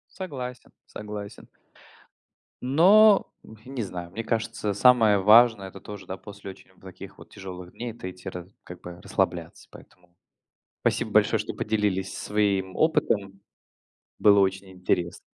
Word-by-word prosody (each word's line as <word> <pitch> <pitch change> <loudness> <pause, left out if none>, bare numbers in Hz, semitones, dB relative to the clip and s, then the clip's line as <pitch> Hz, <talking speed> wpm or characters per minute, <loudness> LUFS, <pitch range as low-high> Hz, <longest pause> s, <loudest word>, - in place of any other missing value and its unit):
Согласен, 130 -9 -7 0.2
согласен. 105 -1 -9 1.1
Но, 195 +10 +5 0.2
м, 110 - -14
не 130 -2 -4
знаю, 90 -3 -7
мне 115 +4 -5
кажется, 115 -2 -2
самое 110 -1 +5
важное- 110 0 +5
это 95 0 -11
тоже, 100 -2 -9
да, 95 - -5
после 100 -1 -10
очень - - -18
таких - - -12
вот - - -15
тяжелых 90 -2 -10
дней- 120 0 -6
это 110 -5 -8
идти 90 +1 -9
рас 90 -1 -8 0.2
как 90 0 -11
бы 90 0 -10
расслабляться, - - -3
поэтому. 90 -1 -18 0.7
Спасибо - - -1
большое, - - +3
что - - -5
поделились 105 -3 -1
своим 100 -3 -1
опытом. 100 -11 0 0.8
Было 100 -1 +5
очень 95 0 -1
интересно. 90 -2 -2
100 Hz, 135 wpm, -25 LUFS, 95-115 Hz, 1.1 s, Но